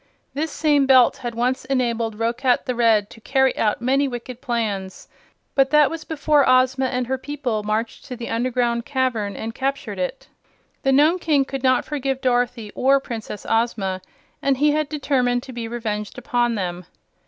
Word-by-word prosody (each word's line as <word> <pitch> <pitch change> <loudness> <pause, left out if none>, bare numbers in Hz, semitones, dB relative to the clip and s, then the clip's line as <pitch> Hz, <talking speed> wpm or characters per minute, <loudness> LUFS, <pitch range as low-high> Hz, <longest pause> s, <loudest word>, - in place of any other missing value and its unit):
This 310 +3 -2
same 290 -3 +2
Belt 255 -2 +6
had 240 -2 -5
once 250 +2 0
enabled 235 -4 -1
Roquat 240 +3 +1
the 250 - -1
Red 225 -4 +2
to 225 - -14
carry 265 +2 +2
out 215 +2 0
many 275 +3 +2
wicked 245 -1 -7
plans; 210 -7 -3 0.5
but 270 -1 +3
that 300 -1 +5
was 325 -1 -6
before 300 -2 +2
Ozma 260 +1 +3
and 250 -1 -1
her 260 +1 -2
people 265 -6 -3
marched 215 +2 -3
to 255 - -6
the 235 -1 -6
underground 235 0 0
cavern 250 -7 -1
and 225 +1 -5
captured 275 +3 -3
it. - - -4 0.5
The 270 - +2
Nome 305 +7 +4
King 295 -5 +2
could 270 0 -5
not 255 -1 +2
forgive 270 -3 -2
Dorothy 245 -4 0
or 275 +1 +3
Princess 225 -5 -7
Ozma, 215 -5 0 0.4
and 275 -1 +1
he 295 +2 +3
had 305 -1 0
determined 255 -5 0
to 260 - -10
be 235 -1 -5
revenged 215 -3 -4
upon 240 -1 0
them. 180 -3 -4
250 Hz, 175 wpm, -22 LUFS, 230-275 Hz, 0.5 s, Belt